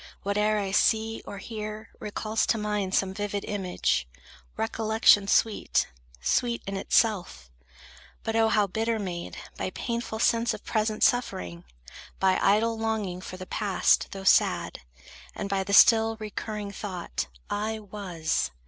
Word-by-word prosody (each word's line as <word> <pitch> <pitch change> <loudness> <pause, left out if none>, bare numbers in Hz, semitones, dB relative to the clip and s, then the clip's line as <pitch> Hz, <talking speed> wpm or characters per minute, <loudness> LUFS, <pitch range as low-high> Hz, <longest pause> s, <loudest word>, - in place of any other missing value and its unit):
Whate'er 210 +2 +1
I 200 -2 -2
see 220 +2 +2
or 200 - -6
hear, 215 +1 -7
recalls 215 +1 -2
to 230 - +2
mind 210 -3 -1
Some 190 -1 +1
vivid 205 0 -3
image, 180 - -1 0.5
recollection 220 -2 +3
sweet; 215 +1 +2 0.3
Sweet 235 - 0
in 195 - -4
itself, 195 - 0 0.7
but 225 - -2
O 225 0 +4
how 210 -2 +3
bitter 220 +4 -1
made 180 -4 -5 0.2
By - - -2
painful 235 +2 -4
sense 230 +1 +2
of - - -13
present 215 -1 0
suffering, 90 - 0 0.5
By 190 -1 +3
idle 220 +3 +3
longing 215 -5 -2
for 185 - -8
the 185 - -7
past, 200 -1 +2
though 195 -1 -7
sad, - - +3 0.6
And 200 - -4
by 195 -1 0
the 200 - -5
still 225 +2 +6
recurring 210 -1 -5
thought, 185 - -4 0.2
"I 215 +2 -2
was"! 190 - -2
210 Hz, 140 wpm, -27 LUFS, 190-220 Hz, 0.7 s, still